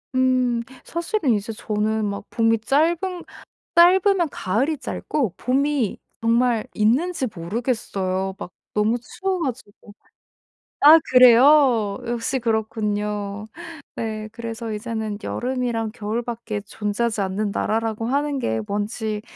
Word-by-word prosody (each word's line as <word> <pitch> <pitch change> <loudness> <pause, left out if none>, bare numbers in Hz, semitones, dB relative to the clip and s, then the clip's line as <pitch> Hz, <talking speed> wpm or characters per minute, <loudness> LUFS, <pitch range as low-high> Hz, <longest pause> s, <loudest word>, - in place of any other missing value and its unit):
음. 255 -2 +2 0.2
사실은 340 - -1
이제 210 +1 -2
저는 215 0 -1
막 200 0 -4
봄이 225 -1 +2
짧은 305 +9 +2 0.8
짧으면 360 0 +5
가을이 265 +9 -1
짧고 260 - -2
봄이 270 -3 0 0.2
정말 230 0 +2
있는지 265 +8 +1
모르겠어요, 190 -1 -2
막 180 - -7 0.2
너무 215 +3 +2
추워 375 +9 -3
가지고. 230 -6 -7 0.9
아 310 +3 +9
그래요? 250 -3 +6
역시 240 +2 -1
그렇군요. 210 -2 -2 0.5
네 215 -1 -4
그래서 230 0 -6
이제는 220 -1 -4
여름이랑 240 -3 -2
겨울밖에 225 0 -4
존재하지 210 +2 -2
않는 200 +2 -1
나라라고 225 +1 -1
하는 285 +3 0
게 110 - -1
뭔지 210 +1 -3
230 Hz, 250 characters per minute, -22 LUFS, 210-260 Hz, 0.9 s, 아